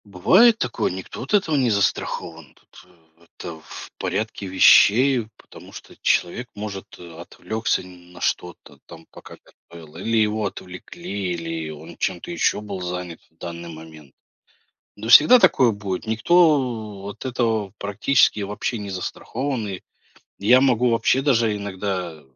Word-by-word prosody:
Бывает 180 - +4
такое, 125 - -2
никто 95 0 -8
от 135 - -7
этого 165 -6 +1
не 130 -4 +2
застрахован, 85 - -2
это 90 -1 -20 0.4
это 80 -2 -8
в - - -11
порядке 110 -2 -3
вещей, 115 +6 +5
потому - - -15
что - - -12
человек 120 +8 0
может, 105 -2 -6
э, 85 -2 -12
отвлекся 110 +5 -3
на 90 -1 -15
что-то 90 0 -4
там 80 -1 -13
пока - - -13 0.3
готовил 80 -2 -13
или 115 0 -1
его 110 0 +1
отвлекли, 95 - -6
или 80 -2 -5
он 80 +2 -11
чем-то 90 - -3
еще 170 - 0
был 100 -3 -7
занят 90 -1 -5
в 80 - -38
данный 85 0 -8
момент. 80 -3 -12 0.9
Ну 110 +2 -7
всегда 155 - +8
такое 125 - +4
будет, 100 -3 -5
никто 120 - +1
от 105 - -9
этого 115 -5 -1
практически 105 +2 +2
вообще 105 +4 -3
не 100 -1 -7
застрахован. 115 +5 -4
И 95 -2 -6 0.6
я 120 +6 +5
могу 125 -2 +2
вообще 115 +3 +2
даже 115 -6 +2
иногда 95 -5 -5
100 Hz, 140 wpm, -22 LUFS, 90-120 Hz, 0.9 s, всегда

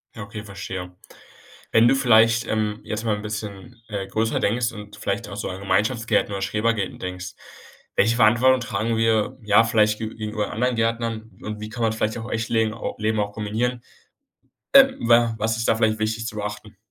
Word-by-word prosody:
Ja, 115 - -6
okay, 105 +1 -8
verstehe. 95 -3 -7 0.8
Wenn 115 +1 +6
du - - +5
vielleicht, 115 -3 +4
ähm, 110 -1 -1
jetzt 105 +1 -4
mal 110 - +1
'n 105 - -7
bisschen, 105 +2 -7
äh, 100 -3 -4
größer 110 +3 0
denkst 115 +3 +1
und 105 -1 -10
vielleicht - - -3
auch - - -7
so - - -4
an 95 +1 -6
Gemeinschaftsgärten 105 +3 +1
oder 100 - -3
Schrebergärten 105 0 -1
denkst, 90 0 -6 0.6
welche 115 +3 +3
Verantwortung 125 +3 +5
tragen 110 +1 -1
wir, 115 +3 +1
ja, 105 +2 +5
vielleicht 110 -2 +2
ge 110 - -3
gegenüber 110 -1 -3
anderen 125 +3 0
Gärtnern 115 -1 -1
und 105 0 -5
wie 110 - -6
kann 120 +1 -4
man 110 -1 +2
vielleicht 110 0 -1
auch 115 - -6
im - - -7
echten 110 0 -2
legen 110 -1 +2
o 110 - -5
Leben 110 0 0
auch 100 0 -2
kombinieren? 115 +4 -2 0.9
Ähm, 270 -1 +8
wa 115 -1 +5
was 110 +1 0
ist 115 - -2
da - - +4
vielleicht 110 -1 +1
wichtig 110 +1 -2
zu 110 - -6
beachten? 105 0 -6
110 Hz, 195 wpm, -23 LUFS, 105-115 Hz, 0.9 s, Ähm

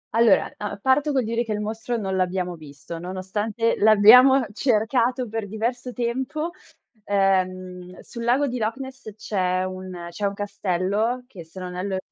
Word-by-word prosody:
Allora, 230 -3 +5
uhm, 210 -1 -4
parto 275 +5 +2
col 260 -3 +1
dire 230 +2 -1
che 220 -2 -3
il 210 - -2
mostro 225 +3 -3
non 195 -3 -2
l'abbiamo 180 -1 -1
visto, 155 +2 -10
nonostante 205 +5 -2
l'abbiamo 240 +5 +7
cercato 245 +1 +1
per 220 -1 -4
diverso 240 +4 -3
tempo. 260 +7 -2 0.5
Ehm, 185 -2 0
sul 235 -1 -8
lago 250 +5 +2
di 250 -3 -3
Loch 220 +1 -1
Ness 265 -4 -8
c'è 185 -4 -1
un 185 -2 -6
c'è 205 +4 -3
un 200 - -4
castello 205 +4 -1
che 190 -9 -11
se 165 +4 -12
non 180 -1 -6
erro, 190 +1 -2
215 Hz, 160 wpm, -24 LUFS, 185-240 Hz, 0.5 s, l'abbiamo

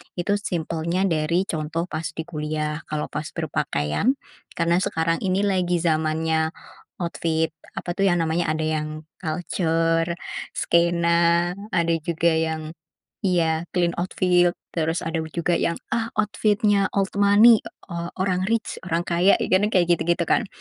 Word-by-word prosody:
Itu 200 +3 0
simpelnya 170 0 -2
dari 170 0 +1
contoh 160 -2 -3
pas 155 0 -3
di 160 - -3
kuliah. 150 -1 -3
Kalau 150 0 -3
pas 150 +1 -4
berpakaian, 150 - 0 0.4
karena 170 +1 +2
sekarang 165 -1 0
ini 195 +1 +1
lagi 180 -3 +1
zamannya 160 0 +1 0.5
outfit, 160 -2 -1 0.2
apa - - -5
tuh 195 -1 +3
yang 175 - +2
namanya 165 0 0
ada 155 0 -2
yang 155 0 -3 0.2
kalcer, 165 0 0 0.4
skena, 170 0 +2 0.2
ada 170 0 +2
juga 170 +1 +1
yang 160 -1 -2 0.5
iya, 165 -3 +1
clean 175 -1 +2
outfit. 175 -1 +2 0.2
Terus 160 0 -1
ada 165 0 -2 0.2
juga 170 0 +1
yang, 170 - +1 0.2
ah, 225 -1 0
outfit-nya 210 -1 +2
old 195 -1 +1
money, 210 +3 +7 0.3
o 170 0 -4
orang 185 -1 +1
rich, 225 +1 -1
orang 170 -1 0
kaya. 175 +2 +3
Iya - - -2
kan 205 +2 +1
kayak 180 -2 +4
gitu-gitu 170 0 +2
kan. 225 - +2
170 Hz, 140 wpm, -23 LUFS, 160-180 Hz, 0.5 s, money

